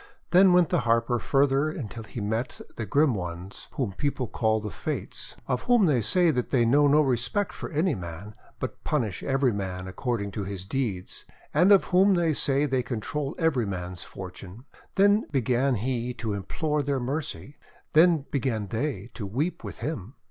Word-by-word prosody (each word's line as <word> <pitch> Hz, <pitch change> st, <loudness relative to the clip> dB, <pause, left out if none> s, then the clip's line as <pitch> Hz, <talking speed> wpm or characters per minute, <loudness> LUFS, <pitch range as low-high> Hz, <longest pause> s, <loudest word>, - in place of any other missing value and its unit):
Then 185 Hz, +1 st, +7 dB
went 180 Hz, -3 st, +5 dB
the -, -, +2 dB
Harper 115 Hz, +1 st, +1 dB
farther 140 Hz, +3 st, +2 dB
until 120 Hz, -7 st, -6 dB
he 110 Hz, +1 st, -7 dB
met 110 Hz, +4 st, -2 dB, 0.2 s
the 110 Hz, -, -4 dB
grim 145 Hz, +5 st, +3 dB
ones 90 Hz, 0 st, -6 dB
whom 125 Hz, -7 st, -1 dB
people 140 Hz, +3 st, -1 dB
call 110 Hz, 0 st, +1 dB
the 105 Hz, -1 st, -5 dB
Fates, -, -, -5 dB
of 125 Hz, -, -1 dB
whom 240 Hz, -4 st, +5 dB
they 140 Hz, -8 st, +3 dB
say 170 Hz, -, +3 dB
that 125 Hz, -4 st, -2 dB
they 120 Hz, -4 st, +3 dB
know 145 Hz, +5 st, +5 dB
no 150 Hz, +2 st, +5 dB
respect 135 Hz, -, 0 dB
for -, -, -6 dB
any 160 Hz, +2 st, +1 dB
man, 90 Hz, +1 st, -7 dB, 0.3 s
but -, -, -5 dB
punish 115 Hz, -, -1 dB
every 135 Hz, -3 st, +1 dB
man 95 Hz, -2 st, -4 dB
according 100 Hz, 0 st, -2 dB
to 100 Hz, +1 st, -4 dB
his 95 Hz, -1 st, -6 dB
deeds, 100 Hz, -6 st, -3 dB, 0.3 s
and 185 Hz, +3 st, +5 dB
of 200 Hz, -, +7 dB
whom 190 Hz, +2 st, +6 dB
they 170 Hz, -2 st, +2 dB
say 140 Hz, 0 st, +2 dB
they 130 Hz, -3 st, +1 dB
control 135 Hz, +5 st, -3 dB
every 145 Hz, -, +1 dB
man's 90 Hz, -2 st, -5 dB
fortune. 95 Hz, +5 st, -10 dB, 0.3 s
Then 205 Hz, +2 st, +4 dB
began 130 Hz, 0 st, +2 dB
he 120 Hz, +2 st, -2 dB
to 110 Hz, -3 st, -3 dB
im 100 Hz, -1 st, -4 dB
plore 150 Hz, -2 st, -1 dB
their 140 Hz, -1 st, 0 dB
mercy. 140 Hz, +2 st, -4 dB, 0.4 s
Then 160 Hz, -2 st, +5 dB
began 115 Hz, -7 st, -1 dB
they 125 Hz, +1 st, -3 dB
to 100 Hz, -, -5 dB
weep 145 Hz, -, -2 dB
with -, -, -7 dB
him. 125 Hz, -, -5 dB
125 Hz, 180 wpm, -27 LUFS, 105-150 Hz, 0.4 s, Then